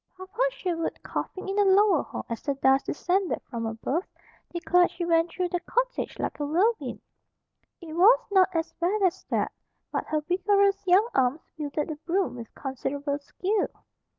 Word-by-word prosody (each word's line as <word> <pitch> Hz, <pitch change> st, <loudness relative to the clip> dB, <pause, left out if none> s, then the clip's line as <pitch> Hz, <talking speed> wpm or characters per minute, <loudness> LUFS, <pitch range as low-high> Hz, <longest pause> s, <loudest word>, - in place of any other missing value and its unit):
Papa 375 Hz, +5 st, -6 dB
Sherwood, 345 Hz, -9 st, -3 dB
coughing 380 Hz, -, -4 dB
in 390 Hz, -, -2 dB
the 410 Hz, -, +5 dB
lower 390 Hz, -3 st, +5 dB
hall -, -, -7 dB
as 230 Hz, -1 st, -5 dB
the 280 Hz, -, -1 dB
dust 270 Hz, 0 st, +3 dB
descended 365 Hz, +4 st, 0 dB
from 230 Hz, -2 st, -4 dB
above, 245 Hz, +10 st, -2 dB, 0.5 s
declared 355 Hz, +1 st, +3 dB
she 350 Hz, 0 st, -4 dB
went 330 Hz, 0 st, +3 dB
through 360 Hz, 0 st, -2 dB
the 355 Hz, -, -1 dB
cottage -, -, -2 dB
like -, -, -3 dB
a 290 Hz, -, -1 dB
whirlwind. 400 Hz, +10 st, +1 dB, 0.8 s
It 320 Hz, -2 st, -8 dB
was 415 Hz, +9 st, +6 dB
not 380 Hz, -1 st, +5 dB
as 330 Hz, -2 st, -2 dB
bad 385 Hz, +4 st, +1 dB
as 365 Hz, -3 st, +1 dB
that, -, -, -1 dB, 0.4 s
but -, -, -2 dB
her 310 Hz, -1 st, 0 dB
vigorous 395 Hz, +4 st, +2 dB
young 380 Hz, +5 st, +5 dB
arms 265 Hz, +4 st, +2 dB
wielded 300 Hz, -1 st, -3 dB
the 310 Hz, -, -4 dB
broom 360 Hz, +5 st, -1 dB
with 230 Hz, -2 st, -9 dB
considerable 280 Hz, +2 st, -3 dB
skill. 380 Hz, +8 st, -1 dB
350 Hz, 170 wpm, -27 LUFS, 295-390 Hz, 0.8 s, was